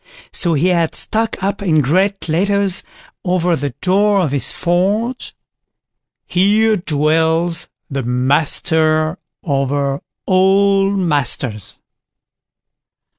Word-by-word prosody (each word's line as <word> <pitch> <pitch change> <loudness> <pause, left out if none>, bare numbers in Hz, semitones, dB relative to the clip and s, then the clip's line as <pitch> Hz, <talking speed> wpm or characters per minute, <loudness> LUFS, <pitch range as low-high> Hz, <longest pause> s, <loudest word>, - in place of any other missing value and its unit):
So 170 -3 +2
he 165 +6 +2
had 170 -3 0
stuck 220 -3 -1
up 200 +1 -2
in 165 -6 +2
great 185 +7 0
letters 195 +3 +1 0.4
over 180 -2 +1
the 145 -1 -3
door 200 +2 +2
of 160 -6 -1
his 135 -3 -1
forge: 200 +8 -1 0.9
_"Here 215 +4 +3
dwells 160 0 0 0.2
the 135 -2 -3
Master 155 +6 +1 0.2
over 140 -1 -1 0.2
all 195 +1 +3
Masters." 135 - -2
170 Hz, 95 wpm, -17 LUFS, 145-195 Hz, 0.9 s, Here